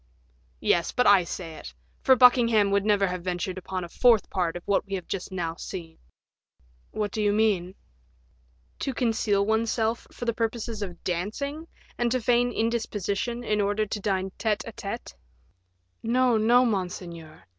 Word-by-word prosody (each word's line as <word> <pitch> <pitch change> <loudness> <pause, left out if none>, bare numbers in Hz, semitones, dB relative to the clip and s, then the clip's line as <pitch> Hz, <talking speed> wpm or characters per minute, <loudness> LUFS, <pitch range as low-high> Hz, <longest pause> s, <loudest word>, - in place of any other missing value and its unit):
"Yes, 170 -1 +2
but 250 - +1
I 200 -3 +6
say 165 -2 -6
it; - - -10 0.3
for 260 - +6
Buckingham 235 -5 +5
would 200 0 +2
never 205 -1 +3
have 180 -2 -3
ventured 180 +1 -3
upon 185 0 -4
a - - -6
fourth 230 +4 +3
part 175 -3 -1
of 175 - -11
what 200 - +2
we 195 - -3
have 185 - -6
just 195 0 -4
now 170 -3 -2
seen." 165 -4 -8 0.9
"What 210 -2 -3
do 215 - -2
you 205 -1 +3
mean?" 200 -4 +1 1.0
"To 270 - -3
conceal 220 -5 +1
oneself 225 +1 0
for 240 - -7
the 235 - +1
purposes 230 -1 -3
of 180 -4 -6
dancing, 280 - -3 0.3
and 240 -1 +1
to 255 - +1
feign 245 +1 +2
indisposition 230 0 -2
in 210 -2 +1
order 205 +2 +1
to 210 0 -4
dine 190 -2 -1
tete 215 -2 0
a 230 - -6
tete." 230 +1 -6 0.9
"No, 245 +1 +2
no, 235 +3 +4
monseigneur." 175 -6 -4
210 Hz, 165 wpm, -26 LUFS, 185-230 Hz, 1.0 s, I